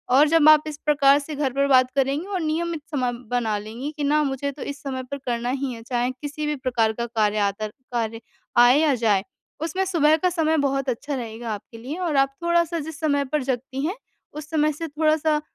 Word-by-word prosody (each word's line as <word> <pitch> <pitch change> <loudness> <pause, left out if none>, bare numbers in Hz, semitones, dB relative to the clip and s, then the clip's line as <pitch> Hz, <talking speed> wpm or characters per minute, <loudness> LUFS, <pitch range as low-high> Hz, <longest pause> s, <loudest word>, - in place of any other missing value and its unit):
और 290 +3 +6
जब 320 -1 +6
आप 305 -1 +7
इस 300 -1 -5
प्रकार 285 -1 +5
से 295 +1 -7
घर 275 -3 -1
पर 275 +1 +2
बात 255 -2 +5
करेंगी 275 +4 +1
और 385 -3 -2
नियमित 325 +1 -2
समय 255 -4 0 0.2
बना 230 -4 0
लेंगी 225 +7 -6
कि 295 - -2
ना 300 +2 +3
मुझे 280 0 -2
तो 280 - -12
इस 280 0 -6
समय 260 -2 -4
पर 280 - -2
करना 240 0 -1
ही 265 0 -2
है, 230 - -9
चाहे 245 +1 -1
किसी 290 +3 -6
भी 300 - 0
प्रकार 240 -5 0
का 235 +2 -3
कार्य 215 -3 0
आतर 215 +2 -5 0.2
कार्य 225 -1 -2 0.4
आए 245 +2 +7
या 305 -2 +3
जाए, 215 -5 +2 0.4
उसमें 335 +5 -1
सुबह 315 -4 +3
का 365 +3 +1
समय 320 -2 +1
बहुत 275 0 -1
अच्छा 280 +4 -3
रहेगा 230 -2 -5
आपके 210 +3 -9
लिए 260 +8 -6
और 310 - -1
आप 275 0 +3
थोड़ा-सा 340 -1 +2
जिस 310 -1 -7
समय 285 -3 +1
पर 300 -3 0
जगती 265 +2 -3
हैं, 360 +5 -2 0.4
उस 300 0 -8
समय 305 -1 +2
से 325 +3 -5
थोड़ा-सा 310 0 +1
280 Hz, 220 wpm, -23 LUFS, 245-305 Hz, 0.4 s, आप